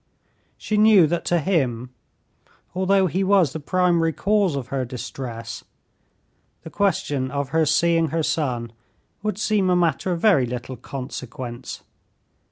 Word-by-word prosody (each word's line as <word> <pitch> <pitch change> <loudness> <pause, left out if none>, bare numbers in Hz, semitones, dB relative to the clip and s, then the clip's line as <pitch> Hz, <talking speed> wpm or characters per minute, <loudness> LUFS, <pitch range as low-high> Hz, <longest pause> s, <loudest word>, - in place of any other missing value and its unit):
She 215 - -2
knew 210 -4 +6
that 170 +2 -2
to 175 - +2
him, 130 -8 -1 0.8
although 190 +1 +2
he 185 +2 0
was 190 -5 +3
the 160 - -4
primary 170 +1 +1
cause 195 0 +1
of 130 -3 -5
her 135 -2 -1
distress, 120 -1 -7 1.0
the 160 - -9
question 145 -9 0
of 140 0 -3
her 160 +1 +2
seeing 165 +1 +3
her 160 +2 -1
son 125 -8 -1 0.5
would 210 -2 -2
seem 210 -3 +1
a 180 - +3
matter 175 +1 +1
of 170 - -1
very 165 - +4
little 125 +2 -5
consequence. 125 -1 -7
160 Hz, 140 wpm, -23 LUFS, 130-185 Hz, 1.0 s, knew